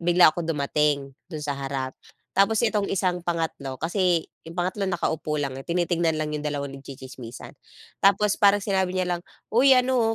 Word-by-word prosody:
bigla 175 Hz, -1 st, +6 dB
akong 170 Hz, -2 st, -4 dB
dumating 145 Hz, -2 st, +1 dB, 0.2 s
doon 155 Hz, -2 st, -5 dB
sa 145 Hz, -1 st, -2 dB
harap. 135 Hz, -1 st, -4 dB, 0.4 s
Tapos 210 Hz, +4 st, +4 dB
itong 215 Hz, -3 st, +1 dB
isang 180 Hz, -2 st, +1 dB
pangatlo 160 Hz, -6 st, -2 dB
kasi 175 Hz, -1 st, +1 dB, 0.2 s
'yong 165 Hz, -, -9 dB
pangatlo 185 Hz, +3 st, -1 dB
nakaupo 160 Hz, -4 st, -1 dB
lang 135 Hz, -1 st, -3 dB
eh, 135 Hz, -, -10 dB
tinitingnan 170 Hz, -1 st, +1 dB
lang 150 Hz, 0 st, -2 dB
'yong 150 Hz, -, -4 dB
dalawa 145 Hz, -1 st, -2 dB
nagtsitsismisan. 130 Hz, -3 st, -9 dB, 0.5 s
Tapos 200 Hz, +1 st, +4 dB
parang 205 Hz, -1 st, +5 dB
sinabi 190 Hz, -2 st, 0 dB
niya 185 Hz, -1 st, 0 dB
lang, -, -, -13 dB, 0.3 s
"Uy 260 Hz, +4 st, +6 dB
ano 250 Hz, -3 st, +2 dB
170 Hz, 165 wpm, -25 LUFS, 145-195 Hz, 0.5 s, bigla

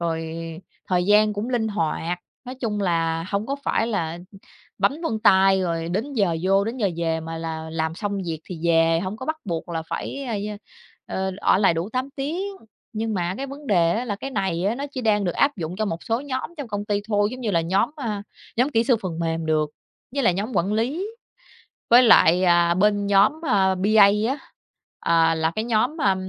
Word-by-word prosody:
rồi 165 Hz, -1 st, -3 dB, 0.5 s
thời 180 Hz, -1 st, +2 dB
gian 210 Hz, +1 st, +5 dB
cũng 210 Hz, +4 st, -4 dB
linh 235 Hz, -3 st, 0 dB
hoạt. 175 Hz, -3 st, -2 dB, 0.3 s
Nói 255 Hz, -, -6 dB
chung 215 Hz, -5 st, -2 dB
là 165 Hz, -3 st, 0 dB
hông 200 Hz, +2 st, -1 dB
có 275 Hz, -, -2 dB
phải 225 Hz, -, +1 dB
là 170 Hz, -7 st, -2 dB, 0.6 s
bấm -, -, +3 dB
vân 225 Hz, -9 st, -1 dB
tay 190 Hz, -2 st, +5 dB
rồi 165 Hz, -1 st, -2 dB
đến 220 Hz, +11 st, -2 dB
giờ 195 Hz, -8 st, +1 dB
vô 195 Hz, +1 st, +3 dB
đến 225 Hz, +4 st, -4 dB
giờ 210 Hz, -6 st, +1 dB
về 165 Hz, -1 st, -1 dB
mà 165 Hz, 0 st, -6 dB
là 160 Hz, -1 st, -5 dB
làm 160 Hz, 0 st, -2 dB
xong 200 Hz, +1 st, -3 dB
việc 160 Hz, -2 st, -3 dB
thì 170 Hz, -4 st, -8 dB
về, 165 Hz, 0 st, +3 dB
hông 190 Hz, +3 st, -4 dB
có 260 Hz, -, -8 dB
bắt 315 Hz, -, -1 dB
buộc 170 Hz, -4 st, -4 dB
là 165 Hz, -1 st, -3 dB
phải, 275 Hz, 0 st, -4 dB
ơ, 235 Hz, -3 st, -3 dB, 0.7 s
ơ, 190 Hz, 0 st, -2 dB
ờ, -, -, -7 dB, 0.2 s
ở -, -, +4 dB
lại 195 Hz, -4 st, +4 dB
đủ 170 Hz, +5 st, -2 dB
8 260 Hz, +2 st, -2 dB
tiếng. 315 Hz, +8 st, -2 dB, 0.5 s
Nhưng 220 Hz, 0 st, -2 dB
mà 180 Hz, -1 st, -1 dB
cái 275 Hz, -, -4 dB
vấn 280 Hz, +1 st, -10 dB
đề 170 Hz, -6 st, +3 dB
á 235 Hz, -, -1 dB
là 205 Hz, -5 st, -3 dB
cái 270 Hz, +6 st, -6 dB
này 185 Hz, -7 st, -1 dB
á 210 Hz, +4 st, +1 dB
nó 280 Hz, +3 st, -4 dB
chỉ 260 Hz, -, -4 dB
đang 210 Hz, -4 st, +2 dB
được 175 Hz, -, 0 dB
áp 280 Hz, -3 st, +2 dB
dụng 170 Hz, 0 st, -5 dB
cho 215 Hz, -, 0 dB
một 165 Hz, -4 st, -4 dB
số 230 Hz, +2 st, 0 dB
nhóm 270 Hz, 0 st, -4 dB
trong 285 Hz, -5 st, -6 dB
công 205 Hz, -1 st, -3 dB
ty 205 Hz, -1 st, 0 dB
thôi, 205 Hz, -1 st, +2 dB
giống 255 Hz, -, -7 dB
như 230 Hz, -4 st, -1 dB
là 170 Hz, -4 st, +2 dB
nhóm, 190 Hz, -, +1 dB
a, 215 Hz, -8 st, -3 dB, 0.3 s
nhóm 250 Hz, +3 st, +3 dB
kỹ 230 Hz, -3 st, +2 dB
sư 250 Hz, -3 st, +3 dB
phần 170 Hz, -3 st, -4 dB
mềm 165 Hz, -1 st, -2 dB
được, 155 Hz, -1 st, +1 dB, 0.4 s
với 280 Hz, -, 0 dB
lại 180 Hz, -7 st, +3 dB
nhóm 210 Hz, +6 st, -3 dB
quản 185 Hz, +4 st, +1 dB
lý, 265 Hz, -, -1 dB, 0.8 s
với 245 Hz, +2 st, +8 dB
lại, 185 Hz, -6 st, +6 dB
à, 170 Hz, -1 st, +4 dB
bên 205 Hz, +2 st, +2 dB
nhóm, 205 Hz, +10 st, +4 dB
a, 195 Hz, -6 st, +3 dB
BA 200 Hz, +2 st, +5 dB, 0.2 s
á, 275 Hz, +3 st, -1 dB, 0.6 s
ờ, 165 Hz, -1 st, +3 dB
là 160 Hz, 0 st, 0 dB
cái 215 Hz, +6 st, -3 dB
nhóm, 235 Hz, +6 st, +1 dB
a, 195 Hz, -2 st, +4 dB
200 Hz, 220 wpm, -23 LUFS, 170-230 Hz, 0.8 s, với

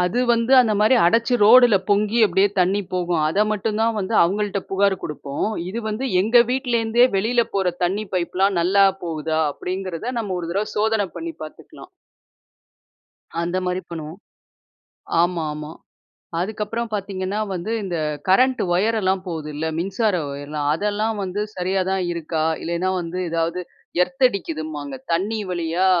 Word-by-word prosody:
அது 180 Hz, +7 st, 0 dB
வந்து 235 Hz, +2 st, +2 dB
அந்தமாரி 215 Hz, -1 st, +4 dB
அடச்சு 230 Hz, +7 st, +3 dB
ரோடுல 235 Hz, 0 st, +7 dB
பொங்கி 210 Hz, +3 st, +2 dB
அப்பிடியே 195 Hz, +1 st, +3 dB
தண்ணீ 185 Hz, +3 st, +2 dB
போகும். 175 Hz, -3 st, 0 dB
அத 200 Hz, +6 st, +2 dB
மட்டும் 215 Hz, +1 st, -2 dB
தான் 230 Hz, 0 st, +2 dB
வந்து 200 Hz, +3 st, -2 dB
அவுங்கள்ட்ட 200 Hz, +2 st, 0 dB
புகார் 195 Hz, 0 st, +2 dB
கொடுப்போம். 145 Hz, +4 st, -3 dB, 0.2 s
இது 225 Hz, +5 st, -4 dB
வந்து 225 Hz, +5 st, -2 dB
எங்க 235 Hz, +4 st, +5 dB
வீட்ல 255 Hz, -2 st, 0 dB
இருந்தே 230 Hz, +2 st, +4 dB
வெளில 235 Hz, +4 st, +2 dB
போற 190 Hz, -2 st, +1 dB, 0.2 s
தண்ணீ 195 Hz, +5 st, 0 dB
பைப் 175 Hz, -1 st, -2 dB
எல்லாம் 195 Hz, 0 st, +2 dB
நல்லா 195 Hz, +3 st, +4 dB, 0.2 s
போகுதா! 160 Hz, -1 st, -2 dB
அப்பிடிங்கிறத 185 Hz, -, -4 dB
நம்ம 195 Hz, -4 st, -3 dB
ஒரு 165 Hz, -, -5 dB
தடவ 205 Hz, +3 st, -1 dB
சோதன 215 Hz, -1 st, +1 dB
பண்ணி 165 Hz, 0 st, -5 dB
பாத்துக்கலாம். 155 Hz, -, -11 dB, 1.5 s
அந்தமாரி 180 Hz, +1 st, -1 dB
பண்ணுவோம். 160 Hz, +2 st, -7 dB, 1.0 s
ஆமா, 175 Hz, -2 st, 0 dB
ஆமா. 150 Hz, +1 st, -7 dB, 0.7 s
அதுக்கப்புறம் 220 Hz, +4 st, -3 dB
பார்த்தீங்கன்னா 195 Hz, 0 st, -3 dB, 0.2 s
வந்து 180 Hz, +5 st, -4 dB
இந்த 175 Hz, -3 st, -3 dB, 0.3 s
கரண்ட் 255 Hz, +7 st, +4 dB
ஒயர்லாம் 195 Hz, -1 st, +1 dB
போகுதுல்ல. 155 Hz, -2 st, -4 dB
மின்சார 195 Hz, +4 st, 0 dB, 0.2 s
ஒயர்லாம், 145 Hz, +1 st, -4 dB
அதெல்லாம் 210 Hz, +4 st, -1 dB
வந்து 190 Hz, +2 st, -3 dB, 0.2 s
சரியா 185 Hz, +1 st, 0 dB
தான் 190 Hz, -1 st, 0 dB
இருக்கா? 160 Hz, -1 st, -2 dB, 0.2 s
இல்லன்னா 170 Hz, +2 st, -1 dB
வந்து 175 Hz, +1 st, -5 dB
ஏதாவது 165 Hz, +2 st, -1 dB, 0.4 s
எர்த் 265 Hz, +6 st, 0 dB
அடிக்குதும்பாங்க. 155 Hz, -, -5 dB, 0.2 s
தண்ணீ 210 Hz, +6 st, 0 dB
வழியா 175 Hz, +1 st, 0 dB
190 Hz, 140 wpm, -22 LUFS, 170-215 Hz, 1.5 s, ரோடுல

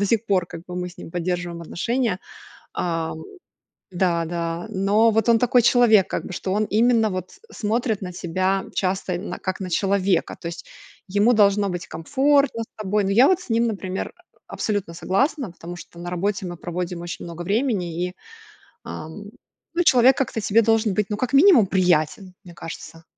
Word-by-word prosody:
до 200 Hz, -, +2 dB
сих 225 Hz, +2 st, +1 dB
пор 185 Hz, -4 st, +1 dB
как 165 Hz, -, -9 dB
бы 180 Hz, -, -7 dB
мы 180 Hz, 0 st, -3 dB
с 175 Hz, -, -19 dB
ним -, -, -9 dB
поддерживаем 175 Hz, -1 st, -3 dB
отношения. 230 Hz, +3 st, -1 dB, 0.5 s
Ам 165 Hz, -2 st, -3 dB, 0.7 s
да, 175 Hz, -2 st, +1 dB
да. 170 Hz, 0 st, -3 dB
Но 210 Hz, +3 st, +3 dB
вот 220 Hz, +1 st, +1 dB
он 230 Hz, -, +6 dB
такой 245 Hz, +1 st, +4 dB
человек 230 Hz, -5 st, +5 dB
как -, -, -3 dB
бы, -, -, -7 dB
что 185 Hz, -, -3 dB
он 210 Hz, -, +1 dB
именно 225 Hz, -1 st, +3 dB
вот 185 Hz, -1 st, -5 dB, 0.2 s
смотрит 220 Hz, 0 st, -1 dB
на 180 Hz, -2 st, -5 dB
тебя 185 Hz, +3 st, -1 dB
часто, 185 Hz, 0 st, -1 dB
именно 175 Hz, +4 st, -4 dB
как 185 Hz, 0 st, -4 dB
на 185 Hz, -2 st, -5 dB
человека. 195 Hz, -1 st, +1 dB
То 170 Hz, -, -4 dB
есть 170 Hz, -, -7 dB, 0.4 s
ему 205 Hz, +5 st, +3 dB
должно 205 Hz, -2 st, +3 dB
быть 180 Hz, -1 st, -4 dB
комфортно 275 Hz, -, +1 dB
с -, -, -10 dB
тобой. 210 Hz, 0 st, 0 dB
Но 195 Hz, -, 0 dB
я 245 Hz, +7 st, +6 dB
вот 375 Hz, -1 st, +3 dB
с 360 Hz, -, -13 dB
ним, 230 Hz, +1 st, +2 dB
например, 190 Hz, -3 st, -4 dB, 0.4 s
абсолютно 200 Hz, -6 st, -3 dB
согласна, 250 Hz, -, 0 dB
потому 175 Hz, +1 st, -9 dB
что 170 Hz, 0 st, -12 dB
на 175 Hz, -, -5 dB
работе 185 Hz, +1 st, -2 dB
мы 175 Hz, -, -6 dB
проводим 175 Hz, +1 st, -4 dB
очень 175 Hz, 0 st, -6 dB
много 170 Hz, 0 st, -7 dB
времени 195 Hz, -5 st, -1 dB
и, 180 Hz, -, -10 dB, 0.7 s
ам, 160 Hz, +7 st, -8 dB, 0.5 s
ну, 350 Hz, -, +2 dB
человек 260 Hz, -4 st, +5 dB
как-то 265 Hz, -5 st, -1 dB
тебе 220 Hz, +2 st, +3 dB
должен 225 Hz, -2 st, +2 dB
быть, 210 Hz, +1 st, +1 dB
ну, 210 Hz, -, -1 dB
как 255 Hz, +3 st, -2 dB
минимум, 280 Hz, -, +7 dB
приятен, 180 Hz, 0 st, +1 dB
мне 175 Hz, -2 st, -12 dB
кажется. 165 Hz, -1 st, -9 dB
195 Hz, 185 wpm, -23 LUFS, 175-225 Hz, 0.7 s, минимум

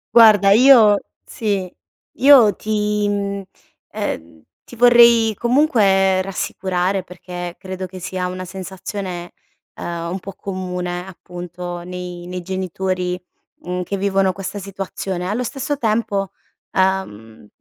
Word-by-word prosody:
Guarda 210 Hz, -4 st, +7 dB
io 225 Hz, -3 st, +7 dB, 0.3 s
sì. 200 Hz, -4 st, -2 dB, 0.5 s
Io 260 Hz, -7 st, +7 dB
ti 210 Hz, -1 st, -1 dB
mhmm, 200 Hz, -1 st, -2 dB, 0.5 s
ehm, 80 Hz, -1 st, -5 dB, 0.2 s
ti -, -, -13 dB
vorrei 235 Hz, -2 st, +6 dB
comunque 205 Hz, -7 st, +3 dB
rassicurare 190 Hz, 0 st, -2 dB
perché 175 Hz, -1 st, -7 dB
credo 185 Hz, 0 st, -6 dB
che 185 Hz, +1 st, -11 dB
sia 185 Hz, 0 st, -3 dB
una 185 Hz, 0 st, -5 dB
sensazione, 185 Hz, -1 st, -6 dB, 0.4 s
uhm, 170 Hz, 0 st, -5 dB
un 190 Hz, -, -3 dB
po' 195 Hz, +1 st, -9 dB
comune, 180 Hz, -2 st, -4 dB
appunto 175 Hz, -1 st, -7 dB
nei 180 Hz, 0 st, -7 dB
nei 180 Hz, 0 st, -5 dB
genitori, 185 Hz, 0 st, -2 dB, 0.4 s
mhmm, 180 Hz, +1 st, -3 dB
che 200 Hz, +3 st, -3 dB
vivono 195 Hz, -1 st, +1 dB
questa 195 Hz, +2 st, -6 dB
situazione. 190 Hz, -2 st, -5 dB
Allo 220 Hz, +6 st, -1 dB
stesso 275 Hz, +3 st, -3 dB
tempo, 215 Hz, -4 st, 0 dB, 0.4 s
uhm, 115 Hz, -, -1 dB
190 Hz, 115 wpm, -20 LUFS, 180-210 Hz, 0.5 s, Guarda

